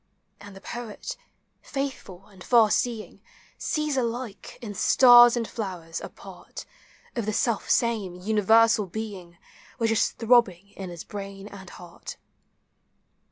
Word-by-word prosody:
And 200 Hz, -1 st, -12 dB
the 195 Hz, -, -12 dB
poet, 235 Hz, -3 st, -7 dB, 0.5 s
faithful 265 Hz, -9 st, -6 dB
and 190 Hz, -4 st, -15 dB
far 230 Hz, -4 st, +4 dB
seeing, 230 Hz, -3 st, -2 dB, 0.4 s
Sees 305 Hz, -2 st, -1 dB
alike, 235 Hz, -4 st, -4 dB
in 225 Hz, -5 st, -7 dB
stars 240 Hz, +3 st, +7 dB
and 230 Hz, -2 st, -2 dB
flowers, 175 Hz, -7 st, -6 dB
;i -, -, -6 dB
pari -, -, -14 dB, 0.7 s
Of 230 Hz, -4 st, -3 dB
the 215 Hz, -, -1 dB
self 225 Hz, 0 st, -1 dB
same, 220 Hz, -7 st, +1 dB
universal 220 Hz, +2 st, +3 dB
being 185 Hz, -4 st, -7 dB, 0.4 s
Which 230 Hz, -2 st, +1 dB
is 225 Hz, -, +2 dB
throbbing 220 Hz, -6 st, +2 dB
in 190 Hz, -2 st, -8 dB
llis 170 Hz, -2 st, -8 dB
brain 195 Hz, -1 st, -8 dB
and 190 Hz, -3 st, -11 dB
heart. 175 Hz, -1 st, -11 dB
215 Hz, 130 wpm, -25 LUFS, 195-235 Hz, 0.7 s, stars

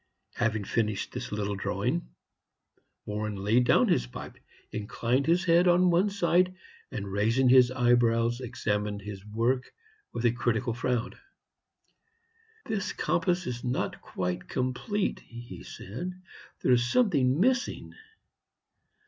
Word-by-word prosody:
Having 110 Hz, -3 st, 0 dB
finished 105 Hz, -1 st, -1 dB
this -, -, -6 dB
little 105 Hz, -1 st, -2 dB
drawing, 95 Hz, -9 st, -2 dB, 1.0 s
Warren 105 Hz, 0 st, -3 dB
laid 105 Hz, +6 st, +2 dB
down -, -, +4 dB
his -, -, +2 dB
pipe, -, -, -9 dB, 0.3 s
inclined 115 Hz, +5 st, -1 dB
his 175 Hz, +3 st, +3 dB
head 170 Hz, +1 st, +5 dB
on 180 Hz, +1 st, +5 dB
one 180 Hz, +4 st, +3 dB
side, 185 Hz, -1 st, +2 dB, 0.3 s
and 100 Hz, -6 st, -5 dB
raising 115 Hz, +6 st, +2 dB
his 125 Hz, -1 st, +7 dB
eyebrows, 120 Hz, -1 st, +2 dB
examined 105 Hz, -4 st, -2 dB
his 100 Hz, -1 st, -7 dB
work 115 Hz, +5 st, -1 dB, 0.4 s
with 115 Hz, -, -3 dB
a 120 Hz, -, +5 dB
critical 120 Hz, 0 st, 0 dB
frown. 125 Hz, 0 st, -2 dB, 1.5 s
"This 205 Hz, -2 st, -2 dB
compass 180 Hz, +1 st, 0 dB
is 120 Hz, -1 st, -4 dB
not 125 Hz, +1 st, -1 dB
yet -, -, -14 dB
quite 90 Hz, 0 st, -4 dB
complete," 130 Hz, -, -1 dB
he 120 Hz, 0 st, -10 dB
said; 180 Hz, -, -7 dB, 0.4 s
"there -, -, +3 dB
is 120 Hz, -1 st, +5 dB
something 145 Hz, -, +3 dB
missing. 250 Hz, +4 st, 0 dB
120 Hz, 125 wpm, -28 LUFS, 105-170 Hz, 1.5 s, his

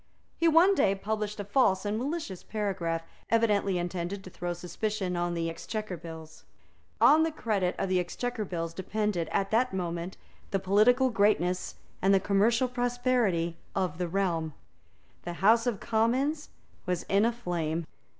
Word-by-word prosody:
He 335 Hz, -, +2 dB
one 335 Hz, +5 st, +6 dB
day 195 Hz, -, +3 dB
published 210 Hz, +1 st, -3 dB
a -, -, -2 dB
false 200 Hz, -2 st, +2 dB
and 205 Hz, +1 st, 0 dB
malicious 265 Hz, -, -3 dB
paragraph, 185 Hz, -6 st, -2 dB, 0.3 s
evidently 210 Hz, -4 st, +2 dB
intended 175 Hz, +2 st, -3 dB
to 185 Hz, -, -10 dB
throw 175 Hz, 0 st, -3 dB
suspicion 180 Hz, +2 st, -3 dB
on 175 Hz, 0 st, -1 dB
the 165 Hz, 0 st, -1 dB
Exchequer 210 Hz, +4 st, -4 dB
Bills. 160 Hz, -1 st, -10 dB, 0.6 s
On 310 Hz, +2 st, +6 dB
the 325 Hz, -, +2 dB
credit 205 Hz, -11 st, -1 dB
of -, -, -1 dB
the 185 Hz, -1 st, +2 dB
Exchequer 220 Hz, +6 st, -3 dB
Bills 165 Hz, -4 st, -4 dB
depended, 190 Hz, -2 st, -2 dB
at 195 Hz, -1 st, 0 dB
that 235 Hz, -1 st, +2 dB
moment, 175 Hz, 0 st, -3 dB, 0.3 s
the 195 Hz, -, +1 dB
political 215 Hz, +7 st, +4 dB
greatness 200 Hz, -4 st, +1 dB, 0.3 s
and 195 Hz, +1 st, +4 dB
the -, -, +5 dB
commercial 215 Hz, +6 st, +2 dB
prosperity 245 Hz, -9 st, 0 dB, 0.2 s
of 185 Hz, -4 st, -1 dB
the 180 Hz, -, -1 dB
realm. 170 Hz, -4 st, -1 dB, 0.7 s
The 175 Hz, -, -5 dB
House 225 Hz, +7 st, +4 dB
of 225 Hz, -5 st, -1 dB
Commons 260 Hz, +7 st, 0 dB, 0.4 s
was 180 Hz, -2 st, -1 dB
in 200 Hz, +1 st, +2 dB
a 230 Hz, -, +3 dB
flame. 170 Hz, -8 st, -3 dB
195 Hz, 155 wpm, -29 LUFS, 175-230 Hz, 0.7 s, one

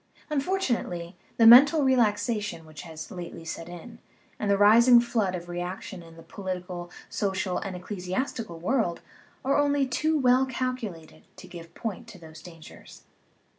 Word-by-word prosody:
Unfortu 300 Hz, 0 st, 0 dB
nately, 175 Hz, -5 st, -5 dB, 0.2 s
the 230 Hz, -, +5 dB
mental 280 Hz, +6 st, +8 dB
relaxation 215 Hz, -7 st, 0 dB
which 155 Hz, -1 st, -11 dB
has 160 Hz, +1 st, -9 dB
lately 175 Hz, -3 st, -8 dB
set 165 Hz, +1 st, -6 dB
in, 225 Hz, +7 st, -11 dB, 0.4 s
and 210 Hz, -, -2 dB
the 200 Hz, -, +3 dB
rising 235 Hz, +4 st, +7 dB
flood 220 Hz, -6 st, -1 dB
of 175 Hz, -1 st, -7 dB
reaction 175 Hz, +1 st, -6 dB
in 165 Hz, -1 st, -15 dB
the 165 Hz, -, -13 dB
political, 180 Hz, -2 st, -6 dB, 0.2 s
social, 190 Hz, -2 st, -2 dB
and 195 Hz, -2 st, -6 dB
ecclesiastical 185 Hz, +2 st, -4 dB
world, 180 Hz, -1 st, -1 dB, 0.4 s
are 275 Hz, +2 st, +2 dB
only 285 Hz, -1 st, +2 dB
too 310 Hz, +5 st, 0 dB
well 260 Hz, -1 st, +3 dB
calculated 240 Hz, -10 st, -5 dB
to 185 Hz, -, -12 dB
give 170 Hz, -2 st, -11 dB
point 225 Hz, 0 st, -5 dB
to 215 Hz, -, -12 dB
those 160 Hz, -2 st, -13 dB
dangers. 165 Hz, -3 st, -14 dB
200 Hz, 150 wpm, -26 LUFS, 175-245 Hz, 0.4 s, mental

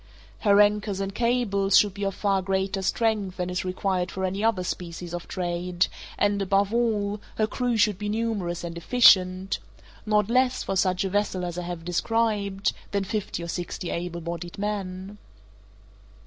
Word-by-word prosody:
Her 200 Hz, -2 st, +4 dB
anchors 210 Hz, -1 st, +3 dB
and 195 Hz, 0 st, -3 dB
cables 210 Hz, -4 st, +2 dB
should 205 Hz, -2 st, +4 dB
be 200 Hz, +1 st, -5 dB
of 195 Hz, -1 st, -2 dB
far 195 Hz, -2 st, +1 dB
greater 190 Hz, +1 st, -1 dB
strength 205 Hz, -1 st, 0 dB
than 180 Hz, -1 st, -2 dB
is 180 Hz, -, -2 dB
required 185 Hz, 0 st, -1 dB
for 190 Hz, 0 st, -3 dB
any 195 Hz, +3 st, -2 dB
other 220 Hz, -5 st, +2 dB
species 175 Hz, -1 st, -5 dB
of 175 Hz, -1 st, -5 dB
trade, 175 Hz, 0 st, -1 dB, 0.3 s
and, 205 Hz, 0 st, +2 dB
above 195 Hz, +2 st, +2 dB
all, 210 Hz, -3 st, 0 dB
her 215 Hz, -, +2 dB
crew 245 Hz, +1 st, -1 dB
should 210 Hz, -2 st, +3 dB
be 210 Hz, 0 st, -3 dB
numerous 205 Hz, -6 st, -2 dB
and 170 Hz, -1 st, -5 dB
efficient—not 195 Hz, 0 st, +2 dB
less, 255 Hz, +2 st, +2 dB
for 195 Hz, -, -2 dB
such 185 Hz, -1 st, +2 dB
a 195 Hz, -, -1 dB
vessel 200 Hz, -2 st, 0 dB
as 175 Hz, 0 st, -4 dB
I 175 Hz, -, -4 dB
have 175 Hz, -2 st, -6 dB
described, 200 Hz, +1 st, 0 dB, 0.2 s
than 200 Hz, -1 st, 0 dB
fifty 200 Hz, -3 st, -3 dB
or -, -, -5 dB
sixty 175 Hz, 0 st, -4 dB
able 170 Hz, 0 st, -4 dB
bodied 170 Hz, +1 st, -6 dB
men. 200 Hz, -1 st, -4 dB
195 Hz, 165 wpm, -26 LUFS, 180-210 Hz, 0.3 s, Her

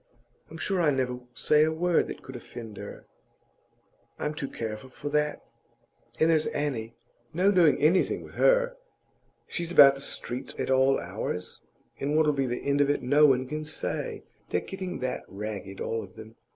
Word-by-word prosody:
I'm 160 Hz, -, -9 dB
sure 190 Hz, +2 st, 0 dB
I 160 Hz, -, +4 dB
never 130 Hz, -3 st, -1 dB, 0.2 s
say 150 Hz, 0 st, +4 dB
a 160 Hz, -, +2 dB
word 170 Hz, +1 st, +2 dB
that -, -, -8 dB
could 130 Hz, -, -9 dB
offend 115 Hz, -3 st, -9 dB
her; -, -, -9 dB, 1.1 s
I'm 150 Hz, -, -2 dB
too 150 Hz, -2 st, -4 dB
careful 110 Hz, +2 st, -6 dB
for 145 Hz, +3 st, -6 dB
that. 150 Hz, 0 st, 0 dB, 0.8 s
And 160 Hz, -, +5 dB
there's 155 Hz, -1 st, +2 dB
Annie; 120 Hz, -6 st, -3 dB, 0.4 s
no 190 Hz, +4 st, +4 dB
doing 170 Hz, -8 st, +5 dB
anything 160 Hz, +6 st, +2 dB
with -, -, -13 dB
her! -, -, +3 dB, 0.7 s
She's 170 Hz, 0 st, -3 dB
about 140 Hz, -5 st, +9 dB
the 135 Hz, -, -8 dB
streets 125 Hz, -2 st, -5 dB
at -, -, -2 dB
all 130 Hz, +1 st, +4 dB
hours, 90 Hz, 0 st, -5 dB, 0.4 s
and 145 Hz, +2 st, 0 dB
what'll 155 Hz, -1 st, +4 dB
be 135 Hz, -2 st, 0 dB
the 120 Hz, 0 st, -4 dB
end 140 Hz, 0 st, +2 dB
of 145 Hz, -, +3 dB
it 145 Hz, -, 0 dB
no 145 Hz, +4 st, +5 dB
one 130 Hz, -2 st, +2 dB
can 155 Hz, +3 st, -4 dB
say. 155 Hz, 0 st, -4 dB, 0.3 s
They're 90 Hz, -, 0 dB
getting 190 Hz, -1 st, -5 dB
that 130 Hz, 0 st, -2 dB
ragged, 100 Hz, -1 st, -6 dB
all 115 Hz, 0 st, -2 dB
of 95 Hz, -3 st, -12 dB
them. 110 Hz, 0 st, -11 dB
140 Hz, 180 wpm, -28 LUFS, 120-155 Hz, 1.1 s, about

